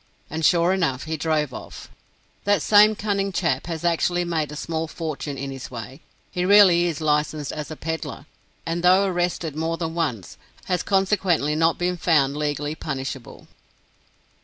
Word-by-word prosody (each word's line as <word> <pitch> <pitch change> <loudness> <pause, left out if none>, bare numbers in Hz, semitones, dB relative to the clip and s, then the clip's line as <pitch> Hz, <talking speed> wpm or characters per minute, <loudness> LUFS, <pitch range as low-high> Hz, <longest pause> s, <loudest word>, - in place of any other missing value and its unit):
And 160 +1 -3
sure 170 +2 +4
enough, 160 -9 0
he 160 +1 -3
drove 155 -3 -1
off. - - -9 0.6
That 205 -5 +2
same 215 +1 +6
cunning 200 -1 -1
chap 165 -6 -1
has 165 -1 -4
actually 175 +1 +1
made 160 -4 -1
a - - -7
small 160 +1 -3
fortune 155 -3 -5
in 135 +1 -5
this 135 -1 -7
way. 125 +4 -8 0.3
He 180 -2 -2
really 185 -3 +6
is 165 -3 -2
licensed 150 -1 0
as 150 -1 -6
a 155 - -6
peddler, 160 -2 -5 0.4
and 170 +1 -2
though 185 +3 +5
arrested 175 -4 -1
more 165 +1 -2
than 165 -1 -3
once, 145 - -3 0.3
has 180 -1 0
consequently 190 -6 +1
not 165 +1 +2
been 180 0 -1
found 150 -5 +2
legally 150 0 -2
punishable. 135 -5 -6
160 Hz, 160 wpm, -23 LUFS, 150-175 Hz, 0.6 s, same